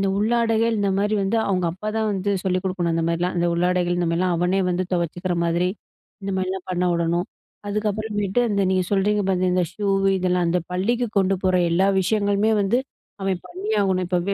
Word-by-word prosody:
இந்த 195 - +1
உள்ளாடைகள் 225 +1 +2
இந்தமாரி 200 +1 +1
வந்து 195 +4 0
அவுங்க 185 -3 0
அப்பா 210 +4 -6
தான் 220 -1 +1
வந்து 195 +1 -1
சொல்லிக் 185 -1 0
கொடுக்கணும். 175 -3 -1
அந்தமாரிலாம், 170 +2 0
அந்த 175 0 +1
உள்ளாடைகள் 175 0 +1
இந்தமாரிலாம் 175 +1 +1
அவனே 180 +3 +1
வந்து 180 +1 0
துவச்சிக்கிற 175 +1 -1
மாதிரி, 170 +2 +1 0.5
இந்தமாரிலாம் 190 -1 -3
பண்ண 180 0 0
விடணும், 170 +1 0 0.4
அதுக்கப்புறமேட்டு 210 0 -1
அந்த 200 -2 0
நீங்க 185 -1 +1
சொல்றீங்க 205 +1 +2
பார்த்த 185 -1 +1
இந்த 180 - +2
ஷூ 205 0 -3 0.3
இதெல்லாம் 180 -1 +1
அந்த 180 +1 +1
பள்ளிக்கு 235 +6 0
கொண்டு 195 0 +2
போற 185 0 +2 0.2
எல்லா 190 +4 +3
விஷயங்களுமே 205 +2 +1
வந்து, 220 +6 +2 0.4
அவன் 190 -2 -1
பண்ணியாகணும். 190 0 0
இப்ப 180 -1 +1
190 Hz, 165 wpm, -23 LUFS, 180-205 Hz, 0.5 s, எல்லா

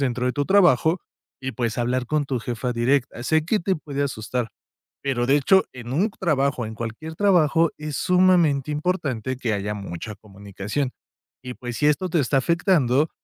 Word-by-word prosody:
dentro 125 -2 -1
de 125 - +1
tu 145 -1 -1
trabajo 175 -3 +4 0.4
y, 130 0 -4
pues, 120 -2 -2
hablar 125 +1 0
con 150 0 0
tu 135 -2 -2
jefa 120 +1 -3
directa. 120 +1 0
Sé 160 +4 +2
que 210 +4 +1
te 190 0 0
puede 145 -2 -4
asustar, 125 -2 -3 0.5
pero, 130 -3 0
de 140 +2 +5
hecho, 190 +7 +4
en 120 0 -7
un 195 +9 +2
trabajo, 140 -8 0
en 110 - -7
cualquier 120 +8 -6
trabajo, 165 -5 +3
es 150 -2 -5
sumamente 180 -7 +3
importante 145 - -2
que 115 -4 -1
haya 100 +1 -2
mucha 100 0 -6
comunicación. 100 +6 -5 0.5
Y 125 0 -6
pues 120 -1 -6
si 150 - +1
esto 180 +5 +1
te 165 - +1
está 135 0 0
afectando, 155 - +2
135 Hz, 175 wpm, -23 LUFS, 120-160 Hz, 0.5 s, de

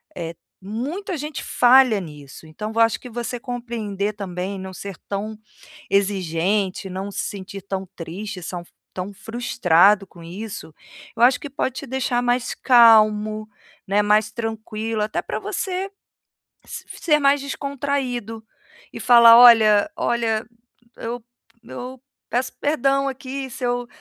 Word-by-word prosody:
eh, 170 -1 -5 0.3
muita 275 - -4
gente 300 0 -5
falha 250 -3 +5
nisso, 150 -2 -11
então 210 +8 -6
eu - - 0
acho 225 -1 +3
que 250 - -10
você 240 +1 -4
compreender 230 -5 -4
também, 195 -1 -5
não 190 0 -7
ser 195 0 -8
tão 210 +2 -4 0.5
exigente, 190 0 0
não 190 +2 -5
se - - -3
sentir 195 0 -7
tão 195 -1 -4
triste, 180 +4 -7
são 175 0 -5 0.3
tão 185 +2 -5
frustrado 200 -3 +2
com 170 -2 -15
isso, 185 -1 -8 0.4
eu 225 - -5
acho 250 +1 +5
que - - -7
pode 265 -2 -2
te 275 - -6
deixar 250 -1 -1
mais 245 0 0
calmo, 215 -3 +5 0.4
né, 200 +2 +3
mais 210 +1 +2
tranquilo, 220 -1 -3
até 215 - -2
pra - - -4
você 380 +1 -3 0.8
se - - -8 0.2
ser 300 -3 +3
mais 280 0 +3
descontraído, 270 -5 -3 0.5
e - - -8
falar: 235 -1 +8
"Olha 225 0 +7
olha, 225 -2 0 0.5
eu 235 +1 -5 0.4
eu 250 +2 -8 0.3
peço 250 +3 -1
perdão 275 -2 +1
aqui 265 0 -6
se 255 - -9
eu 245 0 -1
220 Hz, 135 wpm, -22 LUFS, 200-250 Hz, 0.8 s, falar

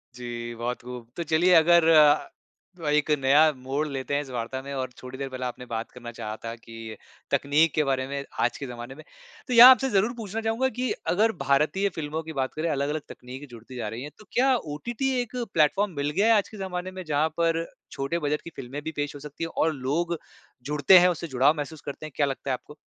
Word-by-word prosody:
जी 120 -1 -6
बहुत 120 +2 -3
खूब। 125 -1 -9
तो 170 - -1
चलिए 165 +3 +3
अगर 170 0 +6
अ, 155 +2 +2
एक 150 0 +2
नया 145 +4 +5
मोड़ 135 +4 -2
लेते 135 -1 -4
हैं 145 - +1
इस 140 - -10
वार्ता 125 +1 -4
में 140 +1 -8
और 130 -1 -3
थोड़ी 130 +1 -8
देर 135 0 -4
पहले 130 -1 -5
आपने 125 0 -6
बात 115 -1 -4
करना 120 -1 -9
चाहा 110 0 -5
था 115 - -4
कि 115 -1 -10 0.4
तकनीक 150 +3 +3
के 155 - +3
बारे 135 -2 0
में 140 0 -4 0.2
आज - - +1
के 140 - -6
ज़माने 120 +1 -8
में। 155 - -12 0.4
तो 250 - -2
यहाँ 240 +2 +11
आपसे 260 +1 +3
ज़रूर 215 +1 +2
पूछना 220 0 -4
चाहूँगा 225 +4 0
कि 250 -2 0 0.2
अगर 220 +5 +3
भारतीय 155 +9 +2
फ़िल्मों 155 0 -3
की 160 0 -8
बात 135 -2 -2
करें 160 +2 -2
अलग-अलग 145 +1 -1
तकनीक 130 +3 -10
जुड़ती 120 +2 -12
जा 120 -4 -3
रही 115 +4 -6
है 145 - -6
तो 215 - -15
क्या 265 +2 +3
ओटीटी 235 - -3
एक 245 0 -7 0.2
प्लेटफ़ॉर्म 190 +6 +3
मिल 145 0 -1
गया 210 +9 +3
आज 200 - -1
के 215 - -11
ज़माने 185 -1 -4
में 185 0 -7
जहाँ 155 +1 +1
पर 165 0 +1 0.3
छोटे 140 +5 -2
बजट 150 -1 -1
की - - -9
फ़िल्में 135 +2 -6
भी 160 - -4
पेश 145 0 -3
हो - - -8
सकती 150 +3 -7
है? - - -1
और 160 -1 +1
लोग 155 +6 -1 0.5
जुड़ते 150 +6 +5
हैं 180 - +5
उसे 170 -1 -3
जुड़ाव 135 +1 +3
महसूस 150 +1 -5
करते 145 +2 -7
हैं, 155 - -8
क्या 145 - +2
लगता 135 0 -4
है - - +2
आपको? 130 +4 -8
150 Hz, 230 wpm, -26 LUFS, 130-170 Hz, 0.5 s, यहाँ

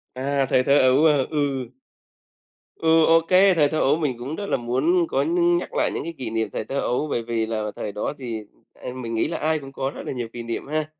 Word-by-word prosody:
À, 135 +1 0
thời 130 - +3
thơ 140 +2 +4
ấu, 130 +4 +4
ờ, 145 -4 +4
ừ. 140 -4 -1 1.1
Ừ, 160 0 +4
OK. 165 0 +4 0.3
Thời 150 -3 +3
thơ 155 - -2
ấu 140 +3 +3
mình 145 -7 -2
cũng 135 +6 -5
rất 205 - -5
là - - +1
muốn 140 +9 +1
có 135 - 0
nhưng 175 +2 +2
nhắc 175 - -5
lại - - +1
những - - -3
cái 165 +1 -6
kỷ 125 -4 -4
niệm 110 0 -1
thời - - -3
thơ 140 +4 -3
ấu, 130 +4 -1
bởi 120 -5 -2
vì 115 -1 -1
là 110 -1 -3
thời 105 - -4
đó 105 +7 -3
thì, 115 -5 -5 0.3
à, - - -8
mình 115 -3 -5
nghĩ 110 - +1
là 165 +1 -3
ai 155 0 0
cũng 135 -1 -10
có 135 0 -3
rất - - -6
là - - -4
nhiều 120 -3 -4
kỷ 120 -1 -6
niệm 115 +3 -5
ha. 155 +1 -1
135 Hz, 250 wpm, -23 LUFS, 120-155 Hz, 1.1 s, thơ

